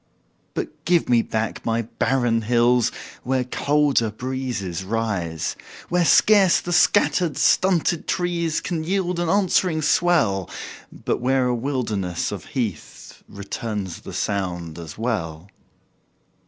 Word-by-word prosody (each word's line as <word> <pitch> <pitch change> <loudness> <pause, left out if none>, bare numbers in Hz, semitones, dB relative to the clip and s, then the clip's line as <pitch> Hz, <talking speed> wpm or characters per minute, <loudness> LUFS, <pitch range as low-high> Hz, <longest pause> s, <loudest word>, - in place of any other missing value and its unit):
But - - -5
give 175 0 +2
me 120 -2 +5
back 110 0 -3
my 115 0 0
barren 120 0 0
hills 120 +1 +3 0.3
Where 130 0 0
colder 140 -2 +1
breezes 110 -6 -4
rise; 95 -7 -2 0.3
Where 175 -1 +2
scarce 200 0 +5
the 175 - -4
scattered, 175 -4 +3
stunted 175 +1 +2
trees 170 -3 -1
Can 165 -3 -3
yield 180 0 -1
an 175 -1 0
answering 180 -4 +2
swell, 150 - +2 0.4
But - - -3
where 130 +1 +2
a 125 - +1
wilderness 115 -9 -2
of - - -6
heath 110 - -5
Returns 100 -2 -5
the - - -9
sound 90 -5 -3
as 80 -3 -9
well. 95 -7 -3
125 Hz, 120 wpm, -22 LUFS, 100-160 Hz, 0.4 s, me